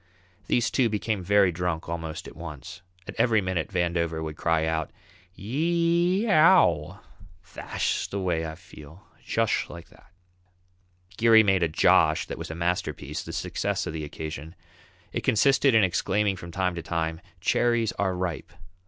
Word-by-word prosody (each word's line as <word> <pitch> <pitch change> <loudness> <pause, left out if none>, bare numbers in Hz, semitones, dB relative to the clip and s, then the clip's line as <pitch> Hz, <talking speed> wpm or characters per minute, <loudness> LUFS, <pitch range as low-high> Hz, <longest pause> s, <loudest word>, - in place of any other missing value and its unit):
These 120 -2 +1
two 125 -4 +2
became 105 -1 -2
very 100 0 +3
drunk 85 -1 -3
almost 80 +1 -5
at - - -12
once. 80 -4 -9 0.3
At - - -6
every 115 -3 +4
minute 95 -4 -2
Vandover 85 -3 -1
would 80 -1 -5
cry 80 0 +1
out, 80 -1 -1 0.5
"Yee 170 - +1
ee - - -3
ow! 105 - +4 0.4
Thash - - -3
way 90 -4 -1
I 80 - -7
feel, 80 0 -15 0.2
jush - - 0
like 85 -1 -11
that." - - -21 1.1
Geary 115 -1 +6
made 95 -3 +2
a 85 - +3
"Josh" 80 0 +3
that - - -7
was - - -6
a 80 - -6
masterpiece, 85 +1 -2
the - - -8
success - - -2
of - - -5
the 80 -1 -4
occasion. 80 +2 -7 0.6
It - - -2
consisted 135 +3 +3
in 110 - +6
exclaiming 100 +2 +1
from 85 -1 -9
time 90 +1 -1
to 85 - -5
time, 80 0 -3 0.2
"Cherries 115 +3 +1
are 95 -2 0
ripe!" 90 -2 -4
90 Hz, 155 wpm, -26 LUFS, 80-110 Hz, 1.1 s, Geary